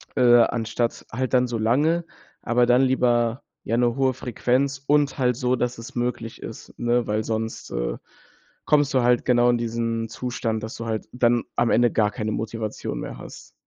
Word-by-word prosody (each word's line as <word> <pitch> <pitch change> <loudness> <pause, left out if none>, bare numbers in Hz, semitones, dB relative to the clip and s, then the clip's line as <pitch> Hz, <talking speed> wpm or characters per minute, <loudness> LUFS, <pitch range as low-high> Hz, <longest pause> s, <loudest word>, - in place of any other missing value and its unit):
äh, 120 -1 +6
anstatt 115 0 -1
halt 130 +2 -3
dann 125 - +4
so 120 - -3
lange, 150 +10 +2 0.4
aber 120 +1 +2
dann 125 +1 +4
lieber, 120 -2 +2 0.2
ja, 115 - -1
'ne 120 -1 +2
hohe 135 -1 +2
Frequenz 130 +2 -1
und 145 -1 +2
halt 125 -2 +2
so, 125 -1 +1
dass 125 0 -2
es 115 - -9
möglich 120 -2 -3
ist, - - -9
ne, 120 0 +1
weil 105 +1 -1
sonst, 110 0 -4
äh, - - -2 0.7
kommst 145 -2 +3
du 130 - +4
halt 120 0 +3
genau 120 -1 +4
in 120 - +1
diesen 115 -1 -2
Zustand, 115 -1 -3
dass 110 +3 -6
du 115 - -6
halt 110 -1 -3
dann 120 -1 +2
am 120 -1 +3
Ende 120 0 +4
gar 105 -2 +2
keine 110 0 -3
Motivation 110 0 -4
mehr - - -7
hast. - - -12
120 Hz, 185 wpm, -24 LUFS, 115-125 Hz, 0.7 s, äh